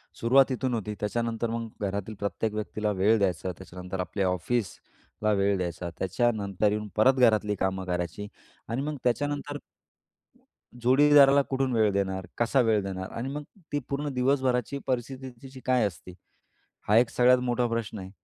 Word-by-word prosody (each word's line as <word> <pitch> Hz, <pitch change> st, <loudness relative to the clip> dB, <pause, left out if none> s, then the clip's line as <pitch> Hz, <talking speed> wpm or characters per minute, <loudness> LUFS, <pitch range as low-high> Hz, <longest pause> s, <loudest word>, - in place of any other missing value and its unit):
सुरुवात 135 Hz, +3 st, +4 dB
इथून 130 Hz, 0 st, -1 dB
होती. 105 Hz, -2 st, -3 dB
त्याच्यानंतर 115 Hz, +2 st, -2 dB
मग 115 Hz, 0 st, -3 dB, 0.2 s
घरातील 100 Hz, +2 st, -3 dB
प्रत्येक 105 Hz, +1 st, -2 dB
व्यक्तीला 105 Hz, 0 st, -2 dB
वेळ 105 Hz, +4 st, +3 dB
द्यायचा. 95 Hz, -1 st, 0 dB
त्याच्यानंतर 90 Hz, 0 st, -8 dB
आपल्या 95 Hz, +1 st, -1 dB
ऑफिसला 105 Hz, +2 st, -3 dB
वेळ 100 Hz, 0 st, +2 dB
द्यायचा. 85 Hz, -1 st, -4 dB
त्याच्यानंतर 100 Hz, 0 st, 0 dB
येऊन 105 Hz, 0 st, -2 dB
परत 130 Hz, +5 st, +5 dB
घरातली 110 Hz, -3 st, +3 dB
कामं 95 Hz, -1 st, -2 dB
करायची 90 Hz, +2 st, -3 dB, 0.4 s
आणि 120 Hz, +4 st, -2 dB
मग 150 Hz, 0 st, -3 dB
त्याच्यानंतर 145 Hz, +3 st, -1 dB, 1.2 s
जोडीदाराला 140 Hz, +2 st, +6 dB
कुठून 135 Hz, -1 st, 0 dB
वेळ 110 Hz, -2 st, +3 dB
देणार? 95 Hz, -2 st, -1 dB
कसा 120 Hz, +3 st, +3 dB
वेळ 110 Hz, -3 st, +2 dB
देणार? 95 Hz, -1 st, -5 dB
आणि 125 Hz, +4 st, -4 dB
मग 150 Hz, 0 st, -4 dB, 0.3 s
ती 145 Hz, -, 0 dB
पूर्ण 145 Hz, +1 st, -2 dB
दिवसभराची 130 Hz, 0 st, +1 dB
परिस्थिती 130 Hz, +1 st, -3 dB
तिची 130 Hz, -1 st, -10 dB
काय 125 Hz, -4 st, +3 dB
असते, 90 Hz, -1 st, -10 dB, 0.7 s
हा 105 Hz, +2 st, +5 dB
एक 120 Hz, 0 st, +4 dB
सगळ्यात 125 Hz, +1 st, +5 dB
मोठा 120 Hz, 0 st, +1 dB
प्रश्न 115 Hz, -3 st, -3 dB
आहे. 95 Hz, 0 st, -8 dB
110 Hz, 150 wpm, -27 LUFS, 100-130 Hz, 1.2 s, जोडीदाराला